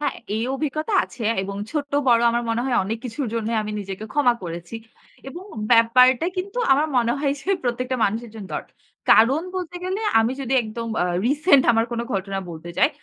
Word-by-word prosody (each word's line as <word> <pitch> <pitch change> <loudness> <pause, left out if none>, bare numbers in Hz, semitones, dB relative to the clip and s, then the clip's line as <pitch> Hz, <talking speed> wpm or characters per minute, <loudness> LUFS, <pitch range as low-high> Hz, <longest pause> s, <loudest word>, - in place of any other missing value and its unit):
হ্যাঁ, 290 -1 -1 0.2
এই 225 - -1
অভিজ্ঞতা 310 +7 -2
আছে। 240 - -11 0.2
এবং 195 +1 -5
ছোট্ট 290 -2 -3 0.2
বড় 235 -1 +5
আমার 235 +1 0
মনে 230 +1 0
হয় 260 -2 0
অনেক 220 +4 -3
কিছুর 250 +3 -3
জন্যই 230 0 -1
আমি 215 0 -5
নিজেকে 195 +1 -6
ক্ষমা 270 -5 +3
করেছি। 170 +3 -7 0.5
এবং 345 +7 -9 0.3
ব্যাপারটা 250 +5 +5
কিন্তু 390 +5 -4
আমার 290 +3 +3
মনে 235 -1 +2
হয় 280 -1 +1
যে, 310 - -11
প্রত্যেকটা 250 +1 -2
মানুষের 225 +3 -2
জন্য 210 -3 -8
দরকার। - - -6 0.4
কারণ 265 +8 +5
বলতে 360 -1 -5
গেলে 380 +3 -2 0.2
আমি 225 +3 +1
যদি 265 -1 -3
একদম 230 +1 -6
আ - - +2 0.2
রিসেন্ট 285 +1 +4
আমার 225 0 +2
কোন 235 - -2
ঘটনা 195 0 -2
বলতে 165 +1 -8
চাই, - - +5
240 Hz, 190 wpm, -22 LUFS, 225-285 Hz, 0.5 s, বড়